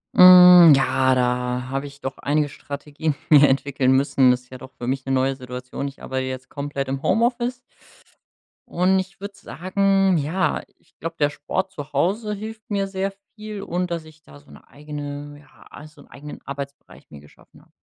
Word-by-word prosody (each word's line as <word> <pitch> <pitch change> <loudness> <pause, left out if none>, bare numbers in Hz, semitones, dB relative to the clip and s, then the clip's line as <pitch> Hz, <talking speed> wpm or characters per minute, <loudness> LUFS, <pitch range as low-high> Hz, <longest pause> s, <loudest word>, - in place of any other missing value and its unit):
Hm, 180 -3 +9
ja, 130 -1 +2
da 125 0 -1
hab 135 +1 -3
ich 140 0 -12
doch 135 0 -5
einige 145 +1 0
Strategien 145 +2 -5
mir 145 -2 +7
entwickeln 135 -1 +1
müssen. 135 -1 +3
Das 125 0 -1
ist 125 - -26
ja 130 - -8
doch 130 +2 -12
für 120 - -6
mich 130 +1 -2
'ne 135 - -1
neue 135 0 +1
Situation. 125 +1 -6
Ich 140 - -11
arbeite 130 0 -3
jetzt 130 0 -7
komplett 140 -1 -5
im 135 0 -3
Homeoffice. 240 +2 0 1.1
Und 185 +2 +2
ich 185 -1 -7
würd 200 0 -8
sagen: 195 0 0
Ja, 160 +6 -1 0.2
ich - - -34
glaub, 165 0 -6
der 145 -1 +2
Sport 190 +5 -4
zu 145 -5 -9
Hause 210 +9 0
hilft 220 +2 -9
mir 200 -1 -1
sehr 195 0 -3 0.2
viel 215 -1 -7
und 180 0 -3
dass 165 -2 -4
ich 155 0 -17
da 145 - -16
so 145 - -21
'ne - - -16
eigene 145 0 -8
ja, 145 0 -21
also 150 0 -14
'n - - -19
eigenen 145 +1 -11
Arbeitsbereich 140 0 -9
mir 75 - -12
geschaffen 75 +1 -20
hab. - - -27
145 Hz, 190 wpm, -22 LUFS, 135-185 Hz, 1.1 s, Hm